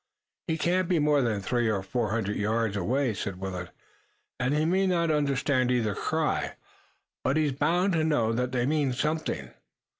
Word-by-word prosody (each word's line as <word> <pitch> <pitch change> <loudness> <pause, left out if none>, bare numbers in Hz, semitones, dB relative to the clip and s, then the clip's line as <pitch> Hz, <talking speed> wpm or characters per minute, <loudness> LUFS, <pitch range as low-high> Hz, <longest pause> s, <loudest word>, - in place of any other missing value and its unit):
"He 160 -1 0
can't 180 +2 +1
be 180 - +3
more 150 -1 +3
than 110 -5 0
three 120 +2 0
or 100 -3 -1
four 115 +2 -1
hundred 105 -1 -1
yards 110 0 0
away," 120 +6 0
said 100 -1 -4
Willet, 90 -2 -5 0.7
"and 125 +1 +1
he 150 +1 +2
may 190 +3 +2
not 170 -3 +2
understand 140 -3 +1
either 115 -4 +1
cry, - - -1 0.7
but 135 +4 +1
he's 155 -2 +2
bound 170 +8 +1
to 160 -2 +2
know 120 -8 +2
that 125 +2 -1
they 125 -1 0
mean 145 -2 +1
something." 155 +5 -2
130 Hz, 175 wpm, -27 LUFS, 110-155 Hz, 0.7 s, be